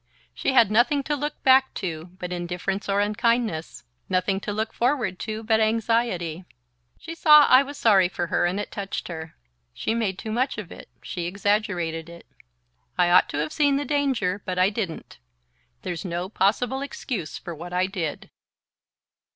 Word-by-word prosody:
She - - -1
had 230 -5 +5
nothing 260 +6 +3
to 295 +2 -1
look 295 +1 -5
back 265 0 +5
to 160 -4 -4
but 180 -1 -5
indifference 180 +3 -3
or 200 +1 +2
unkindness 215 -5 0 0.3
nothing 190 +1 +1
to 205 - -5
look 220 +2 -3
forward 240 -7 0
to 220 0 -5
but 220 0 +2
anxiety. 220 -6 0 0.5
She 330 - -8
saw 300 -2 +7
I 255 - +7
was 280 +1 -7
sorry 195 -8 +4
for 175 - -3
her 175 0 +1
and 185 +3 -2
it 205 - -5
touched 195 -2 -5
her. 160 -2 -7 0.4
She - - -1
made 215 -5 -1
too 220 - -6
much 250 +3 0
of 205 -5 -7
it - - -11
she 175 -2 -4
exaggerated 180 -4 -1
it. 170 0 -12 0.7
I 175 -1 +3
ought 180 - +5
to - - -4
have 150 +1 -2
seen 285 -2 +3
the 285 +1 -1
danger, 265 -10 0
but 185 -1 -4
I 185 +2 +3
didn't. 190 - -5 0.6
There's 175 -2 -4
no 175 0 -3
possible 230 +7 +1
excuse 210 - -5
for 175 - -7
what 170 +3 -9
I 180 +1 +1
did." 180 -6 -5
205 Hz, 175 wpm, -24 LUFS, 175-235 Hz, 0.7 s, saw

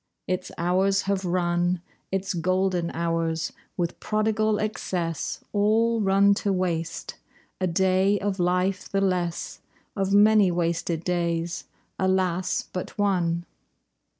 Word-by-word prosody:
Its 185 0 -3
hours 190 +3 +2
have 195 -1 -1
run, 175 0 +1 0.3
Its 195 0 -1
golden 185 0 0
hours, 165 -1 -1 0.2
with 170 -1 -2
prodigal 215 0 +1
excess, 180 -6 -3
All 220 +2 +3
run 200 0 +4
to 200 0 -1
waste. 170 -3 -2 0.4
A 185 - +1
day 190 +3 +3
of 200 -1 -2
life 180 +2 0
the 195 - 0
less; 180 -3 -1 0.4
Of 195 -1 -1
many 205 -1 +6
wasted 170 -1 -1
days, 170 -1 -1 0.3
alas, 185 -1 +1
but 180 - -5
one! 175 -4 +1
185 Hz, 115 wpm, -25 LUFS, 175-195 Hz, 0.4 s, many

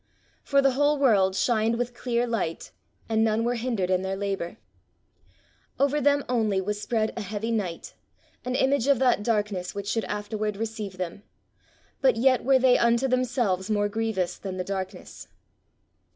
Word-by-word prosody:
"For 280 -1 +2
the 270 - +4
whole 290 +3 +2
world 200 -9 +3
shined 230 +1 +1
with 245 0 -2
clear 240 0 -1
light, 215 -9 -3 0.4
and 220 0 +2
none 220 0 +1
were 240 +1 +1
hindered 230 -6 -1
in 185 0 +2
their 190 0 -2
labour: 195 -3 -3 1.2
"Over 280 +2 +2
them 285 +1 +2
only 220 -5 +1
was 205 +2 -3
spread 220 -1 -1
an 230 - -4
heavy 210 +3 -3
night, 190 -7 -3 0.5
an 250 0 -2
image 265 -1 +2
of 280 -2 +4
that 250 -4 +2
darkness 205 -5 -1
which 200 0 -5
should 225 +1 -1
afterward 210 0 -3
receive 215 -3 -5
them: 180 +1 -5 0.8
but 265 -3 +4
yet 255 +1 +3
were 270 +1 +5
they 255 -1 +4
unto 235 +2 +3
themselves 240 -7 0
more 205 -1 +1
grievous 215 -4 -2
than 190 -2 -5
the 180 - -2
darkness." 190 0 -6
225 Hz, 165 wpm, -26 LUFS, 200-250 Hz, 1.2 s, were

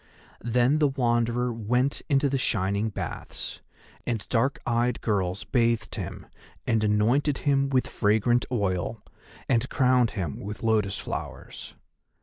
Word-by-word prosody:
Then 125 +5 +2
the 150 - +4
Wanderer 120 -2 +1
went 125 +5 0
into 140 0 +3
the 135 -1 0
shining 100 -2 0
baths, 100 - -6 0.5
and 115 -4 -2
dark 130 +4 +1
eyed 120 +1 +1
girls 95 -3 -1
bathed 115 -4 +1
him - - -6 0.4
and 110 -1 +1
anointed 120 +8 +2
him 140 -1 +3
with 130 -2 +2
fragrant 110 +3 +2
oil, 100 -1 -1 0.4
and 125 0 +1
crowned 125 -3 +3
him 85 -7 -3
with 105 +2 -7
lotus 105 -3 +1
flowers. - - -7
120 Hz, 130 wpm, -26 LUFS, 105-130 Hz, 0.5 s, the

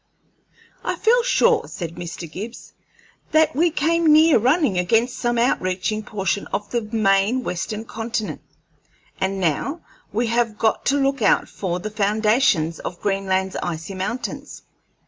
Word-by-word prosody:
"I - - -1
feel 485 +2 +3
sure," 480 -1 +2
said 170 -3 -6
Mr. 175 0 -7
Gibbs, 210 +9 -8 0.6
"that 315 0 +4
we 335 +4 +3
came 330 +1 +2
near 310 -3 +6
running 255 - +2
against 225 +7 +2
some 240 0 0
outreaching 215 -3 0
portion 200 -2 -2
of 205 0 -4
the 240 - 0
main 215 +2 +1
Western 215 +4 -4
Continent, 225 -1 -4 0.8
and 190 +1 -1
now 190 - -1 0.3
we 230 +3 0
have 230 -2 0
got 220 0 0
to 280 - +3
look 275 -2 0
out 200 - +3
for 180 -2 -3
the 215 +4 -5
foundations 210 - +2
of 175 - -6
Greenland's 190 -1 -1
icy 165 +1 -4
mountains." 195 +7 -5
215 Hz, 140 wpm, -22 LUFS, 190-260 Hz, 0.8 s, near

